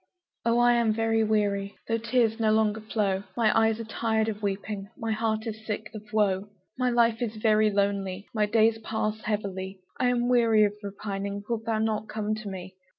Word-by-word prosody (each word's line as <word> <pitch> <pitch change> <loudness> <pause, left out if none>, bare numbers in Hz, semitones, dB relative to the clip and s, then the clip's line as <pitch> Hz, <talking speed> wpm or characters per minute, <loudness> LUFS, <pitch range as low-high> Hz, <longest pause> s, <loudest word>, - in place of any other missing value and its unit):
Oh, 235 0 +2
I 240 0 +5
am 235 -2 +3
very 225 0 +1
weary, 205 -2 0
Though 230 0 0
tears 230 -1 +1
no 220 -1 +3
longer 220 0 +2
flow; 205 -3 0 0.2
My 225 -3 +3
eyes 225 0 +3
are - - -3
tired 220 0 0
of 210 -1 -5
weeping, 200 0 -3
My 225 -3 -3
heart 220 0 -1
is 220 -1 -6
sick 215 0 -4
of 215 - -7
woe; 205 -2 +1 0.3
My 255 -1 +1
life 235 -1 +2
is 230 -2 -2
very 215 0 +3
lonely 200 -1 -1
My 215 -2 +2
days 225 +1 +3
pass 220 -1 -2
heavily, 195 -3 -3 0.2
I'm 245 -1 +2
weary 230 -3 +4
of 205 -1 +2
repining; 200 0 -4
Wilt 230 -2 -2
thou 225 -1 +1
not 215 0 -1
come 215 0 -2
to 215 -1 -5
me? 185 -1 -8
215 Hz, 190 wpm, -27 LUFS, 205-225 Hz, 0.3 s, I